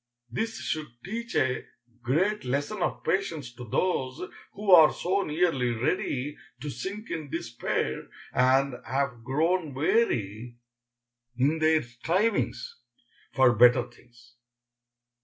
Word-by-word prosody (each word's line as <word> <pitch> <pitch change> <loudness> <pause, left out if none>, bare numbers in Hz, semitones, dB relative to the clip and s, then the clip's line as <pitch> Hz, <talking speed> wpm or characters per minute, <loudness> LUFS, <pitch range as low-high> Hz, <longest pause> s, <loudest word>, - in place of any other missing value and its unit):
This 225 - -2
should 155 -1 -2 0.2
teach 235 +5 -5
a 130 -1 +1 0.4
great 180 - +1
lesson 145 +10 -2
of - - -1
patience 160 -10 -1
to 125 0 -9
those 130 - -1 0.3
who 205 -1 -1
are 160 -4 +9
so 190 +3 0
nearly 155 -7 +1
ready 130 +3 -1 0.2
to 145 +2 -5
sink 195 - -6
in 155 -3 -4
despair, 120 -7 -3 0.3
and 130 0 +2
have 135 -4 -2
grown 155 +3 0
weary 120 - 0 0.8
in 145 +5 +2
their 155 0 +3
strivings 135 - -1 0.6
for 130 -2 +5
better 120 +1 +5
things. 120 0 -21
140 Hz, 115 wpm, -27 LUFS, 125-180 Hz, 0.8 s, are